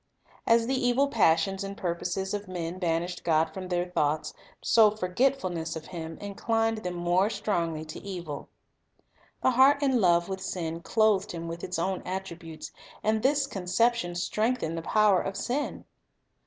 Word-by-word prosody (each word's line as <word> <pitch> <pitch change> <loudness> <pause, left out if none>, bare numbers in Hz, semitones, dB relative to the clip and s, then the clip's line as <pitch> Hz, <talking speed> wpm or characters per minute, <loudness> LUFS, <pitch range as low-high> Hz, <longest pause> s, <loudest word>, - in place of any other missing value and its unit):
As 230 0 +5
the 260 - 0
evil 255 +2 +2
passions 195 -3 +2
and 195 0 -6
purposes 180 +2 -2
of 205 -1 -3
men 175 -1 -4
banished 175 0 -1
God 160 -1 +2
from 185 +1 -6
their 175 -1 0
thoughts, 155 -4 -1 0.3
so 220 -2 +5
forgetfulness 185 -5 -1
of 160 -1 -7
Him 165 -2 -7
in 205 -1 -7
clined 225 +1 0
them 180 -2 -4
more 175 +3 +2
strongly 170 -8 -2
to 155 - -8
evil. 175 -7 -6 0.9
The 260 - +5
heart 275 +3 +5
in 260 -4 +3
love 170 -2 +4
with 190 -1 -4
sin 165 -3 -3
clothed 215 -1 +2
Him 170 -1 -5
with 165 +1 -6
its 180 - -3
own 185 +2 -1
attributes, 175 -4 -6 0.3
and 215 0 +2
this 280 +3 +3
conception 195 -2 0
strengthened 215 -1 -1
the 165 - -3
power 205 +1 +3
of 195 - -4
sin. 280 +4 -2
185 Hz, 160 wpm, -28 LUFS, 170-220 Hz, 0.9 s, As